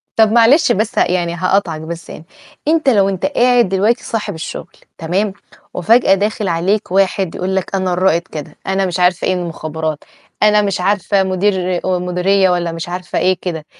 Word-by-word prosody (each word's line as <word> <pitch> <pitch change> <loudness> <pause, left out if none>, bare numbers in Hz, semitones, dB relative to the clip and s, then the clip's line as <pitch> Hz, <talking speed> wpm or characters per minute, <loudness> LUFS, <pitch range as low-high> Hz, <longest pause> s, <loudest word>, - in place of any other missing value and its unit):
طب 220 -1 +4
معلش 240 +8 +5
بس 215 +3 -1
يعني 175 -1 +1
هاقاطعك 180 -3 0
بس 165 +1 -8
يعني، 155 - -10 0.4
أنت 310 -2 +3
لو 200 -5 +3
أنت 190 -2 -3
قاعد 245 -5 +3
دلوقتي 205 +6 +1
صاحب 225 -2 -3
الشُّغل 160 +1 -7 0.3
تمام؟ 190 +5 -1 0.4
وفجأة 215 +4 +3
داخل 210 +1 -2
عليك 180 +4 -1
واحد 190 -1 +1
يقول 190 +1 -2
لك 190 +1 -2
أنا 185 -1 0
الرائد 175 -2 +2
كذا، 155 -5 -9
أنا 195 0 0
مش 180 -1 -3
عارفة 180 -1 +2
إيه - - +2
المُخابرات، 160 -3 -4 0.4
أنا 210 0 +5
مش 200 -3 -2
عارفة 200 +1 +1
مدير 185 -1 0
مديرية 185 +1 +1
والّا 175 -1 0
مش 165 +1 -6
عارفة 180 +1 -3
إيه 185 0 +2
كده، 160 -4 -5
185 Hz, 170 wpm, -16 LUFS, 175-205 Hz, 0.4 s, معلش